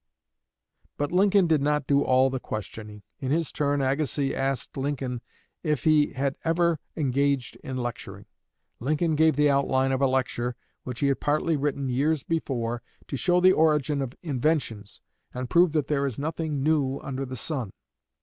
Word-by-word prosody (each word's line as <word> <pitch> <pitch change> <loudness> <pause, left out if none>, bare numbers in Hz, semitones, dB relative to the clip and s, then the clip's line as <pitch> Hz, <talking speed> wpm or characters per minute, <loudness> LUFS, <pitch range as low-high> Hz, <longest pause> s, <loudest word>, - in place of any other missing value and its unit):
But 145 0 -1
Lincoln 195 +1 +4
did 160 -4 +2
not 150 0 +1
do 140 +1 +3
all 130 +1 +3
the 130 - -2
questioning. 105 -1 -7 0.2
In 130 - -3
his 160 +2 0
turn, 145 -1 0
Agassiz 140 0 0
asked 135 0 -2
Lincoln 135 -3 -3 0.4
if 150 -6 -1
he 155 -2 +3
had 135 +1 -1
ever 165 -1 +2 0.2
engaged 140 -2 0
in 130 -3 -6
lecturing. 120 -2 -5 0.5
Lincoln 155 +5 0
gave 160 0 +4
the 145 0 +4
outline 135 -1 +2
of 130 0 0
a 135 - +5
lecture, 125 -2 -1 0.3
which 125 -2 -5
he 140 - +3
had 135 - 0
partly 155 +2 +1
written 140 -1 -1
years 140 +4 +1
before, 120 -7 -2 0.3
to - - -3
show 175 +6 +2
the 185 +1 +6
origin 150 -3 +2
of 130 -1 -4
inventions 135 - -1 0.3
and 125 0 -4
prove 175 -1 +5
that 150 -3 +1
there 140 -2 0
is 130 - -5
nothing 155 -1 -2
new 140 -3 +1
under 135 0 -4
the 130 -1 -6
sun. 125 -6 -3
140 Hz, 170 wpm, -26 LUFS, 130-155 Hz, 0.5 s, the